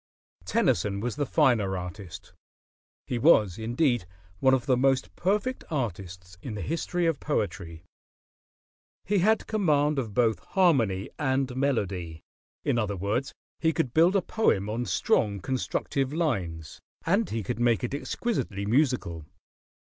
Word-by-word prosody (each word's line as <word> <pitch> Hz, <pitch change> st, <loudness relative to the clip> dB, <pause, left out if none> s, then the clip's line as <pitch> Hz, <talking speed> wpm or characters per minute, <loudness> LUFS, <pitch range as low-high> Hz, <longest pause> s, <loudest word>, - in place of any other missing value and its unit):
Tennyson 100 Hz, +3 st, +1 dB
was 120 Hz, +2 st, -3 dB
the 145 Hz, -1 st, -2 dB
finer 115 Hz, -, +2 dB
artist; 90 Hz, -1 st, -8 dB, 0.7 s
he 120 Hz, -, -2 dB
was, 110 Hz, -, +4 dB
indeed, 120 Hz, -, +1 dB, 0.3 s
one 130 Hz, 0 st, +5 dB
of 125 Hz, -, -3 dB
the 130 Hz, -3 st, +3 dB
most 135 Hz, +1 st, +1 dB
perfect 210 Hz, +8 st, -1 dB
artists 90 Hz, -, -5 dB
in 115 Hz, -3 st, -6 dB
the 105 Hz, -, -4 dB
history 170 Hz, +2 st, -1 dB
of 165 Hz, -5 st, +1 dB
poetry. 95 Hz, -, -3 dB, 1.2 s
He 200 Hz, 0 st, +2 dB
had 220 Hz, +5 st, +2 dB
command 150 Hz, -9 st, +2 dB
of 110 Hz, -6 st, -5 dB
both 110 Hz, -6 st, +2 dB
harmony 120 Hz, -, +1 dB
and 130 Hz, -3 st, 0 dB
melody; 95 Hz, -, -1 dB, 0.4 s
in 120 Hz, -, +2 dB
other 105 Hz, -3 st, -2 dB
words, 105 Hz, +8 st, -1 dB, 0.3 s
he 160 Hz, -, +2 dB
could 145 Hz, -8 st, -1 dB
build 170 Hz, +5 st, +4 dB
a 195 Hz, -, +2 dB
poem 105 Hz, -, +1 dB
on 120 Hz, +2 st, -2 dB
strong 100 Hz, +2 st, +1 dB
constructive 130 Hz, +3 st, -2 dB
lines, 95 Hz, -, -2 dB, 0.2 s
and 200 Hz, +6 st, +2 dB
he 110 Hz, -1 st, -3 dB
could 100 Hz, -, -4 dB
make 120 Hz, 0 st, +2 dB
it 125 Hz, -, -2 dB
exquisitely 140 Hz, -, -2 dB
musical. 110 Hz, -, 0 dB
120 Hz, 140 wpm, -27 LUFS, 100-150 Hz, 1.2 s, one